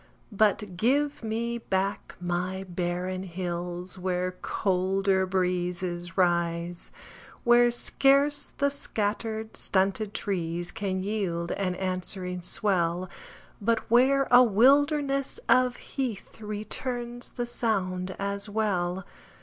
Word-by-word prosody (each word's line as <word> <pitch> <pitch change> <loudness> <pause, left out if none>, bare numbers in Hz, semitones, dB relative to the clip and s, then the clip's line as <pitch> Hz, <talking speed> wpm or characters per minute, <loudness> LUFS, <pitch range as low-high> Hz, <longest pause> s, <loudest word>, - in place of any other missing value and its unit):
But 205 -2 +1
give 280 +7 +1
me 235 +1 -2
back 195 -2 -2
my 180 +2 -2
barren 180 +1 -2
hills 180 0 -4
Where 180 0 -1
colder 190 0 +1
breezes 180 -2 -1
rise; 170 -1 0 0.5
Where 240 0 +6
scarce 275 +4 +2
the 280 0 +2
scattered, 220 -3 -2
stunted 200 +2 0
trees 175 -2 -2
Can 190 -2 -2
yield 185 -5 -2
an 185 -2 -1
answering 185 0 -1
swell, 180 -1 +1 0.5
But 225 +1 +2
where 270 +3 +5
a 245 0 +9
wilderness 275 +5 +3
of 255 -1 +4
heath 235 -5 -5
Returns 240 +3 -4
the 240 - -2
sound 190 -6 -1
as 200 +1 -3
well. 190 -4 -1
195 Hz, 100 wpm, -27 LUFS, 180-230 Hz, 0.5 s, a